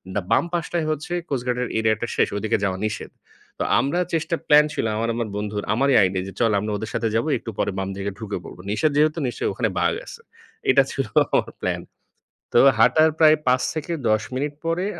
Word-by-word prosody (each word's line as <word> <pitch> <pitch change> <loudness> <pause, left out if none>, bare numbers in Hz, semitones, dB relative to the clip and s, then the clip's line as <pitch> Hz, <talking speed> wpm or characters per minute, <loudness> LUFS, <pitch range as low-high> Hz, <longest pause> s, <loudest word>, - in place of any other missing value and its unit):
দা 100 - +1
বাম - - +4
পাশটায় 170 -1 -1
হচ্ছে 155 +3 -4 0.2
কোস্ট 130 -4 -2
গার্ডের 125 0 -1
এরিয়া 110 -1 +2
টা - - -1
শেষ, - - +3
ঐদিকে 110 +1 0
যাওয়া 95 -1 0
নিষেধ। 110 0 -4 0.5
তো - - +1 0.2
আমরা 170 +6 0
চেষ্টা 165 +1 0
প্ল্যান 150 0 +7
ছিল - - -1
আমার, 115 +1 -1
আমার 115 -2 -2
বন্ধুর। 105 0 -3
আমারই 135 +3 +2
আইডিয়া 95 -1 +1
যে, 95 - -8
চল 115 -2 +3
আমরা 105 +2 -3
ওদের 110 +2 -5
সাথে 115 -1 0
যাবো, 115 +7 +1
একটু 115 - -8
পরে - - 0
বাম 95 - -3
দিকে 100 +1 -3
ঢুকে 105 -2 -4
পড়ব। - - -11
নিষেধ 110 +9 +1
যেহেতু 155 +2 +3
নিশ্চয়ই 120 - -2
ওখানে - - 0
বাঘ - - +2
আছে। 465 - -11 0.5
এইটা - - +6
ছিল - - -2 0.3
আমার - - +1
প্ল্যান। - - -1 0.7
তো 470 - +6 0.2
হাঁটার 160 0 +5
প্রায় 155 -1 +7
৫ 130 +1 +4
থেকে 160 +2 -4 0.2
১০ 110 0 +2
মিনিট 145 +2 -2
পরে 170 +3 0
125 Hz, 210 wpm, -23 LUFS, 105-155 Hz, 0.7 s, প্ল্যান